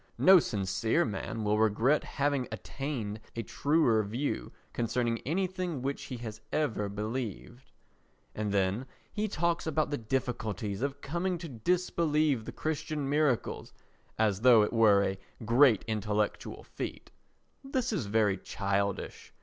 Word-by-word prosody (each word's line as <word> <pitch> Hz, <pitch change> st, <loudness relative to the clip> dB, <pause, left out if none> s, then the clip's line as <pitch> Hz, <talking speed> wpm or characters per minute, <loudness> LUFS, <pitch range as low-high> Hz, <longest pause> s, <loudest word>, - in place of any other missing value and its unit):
No 190 Hz, 0 st, +8 dB
sincere 110 Hz, -, 0 dB
man 110 Hz, +1 st, -4 dB
will 105 Hz, 0 st, +2 dB
regret 110 Hz, +7 st, +3 dB
having 140 Hz, -3 st, -1 dB
attained 120 Hz, -7 st, -4 dB, 0.2 s
a 115 Hz, -, -2 dB
truer 145 Hz, -7 st, +2 dB
view 105 Hz, -, -3 dB, 0.2 s
concerning 120 Hz, 0 st, 0 dB
anything 180 Hz, -3 st, -1 dB
which 140 Hz, +1 st, -3 dB
he 130 Hz, -3 st, -6 dB
has 110 Hz, -2 st, -7 dB
ever 115 Hz, -9 st, 0 dB
believed. 110 Hz, +3 st, -5 dB, 0.6 s
And 105 Hz, -1 st, -2 dB
then 100 Hz, +5 st, 0 dB, 0.3 s
he 215 Hz, 0 st, -1 dB
talks 170 Hz, -3 st, 0 dB
about 155 Hz, -1 st, 0 dB
the 145 Hz, -, -1 dB
difficulties 110 Hz, -4 st, -2 dB
of 140 Hz, +1 st, -2 dB
coming 175 Hz, +5 st, -1 dB
to 170 Hz, 0 st, -7 dB
disbelieve 155 Hz, -1 st, +1 dB
the -, -, -5 dB
Christian 155 Hz, -2 st, -3 dB
miracles 145 Hz, -5 st, 0 dB, 0.4 s
as 105 Hz, -3 st, +1 dB
though 120 Hz, -3 st, +7 dB
it 105 Hz, -, -2 dB
were 105 Hz, -3 st, +5 dB
a 95 Hz, -1 st, -2 dB, 0.3 s
great 120 Hz, -1 st, +5 dB
intellectual 105 Hz, -1 st, -2 dB
feat. -, -, -7 dB, 0.5 s
This 260 Hz, -3 st, -1 dB
is 150 Hz, -, -2 dB
very 105 Hz, -2 st, +2 dB
childish. 100 Hz, 0 st, -2 dB
120 Hz, 135 wpm, -30 LUFS, 105-150 Hz, 0.6 s, No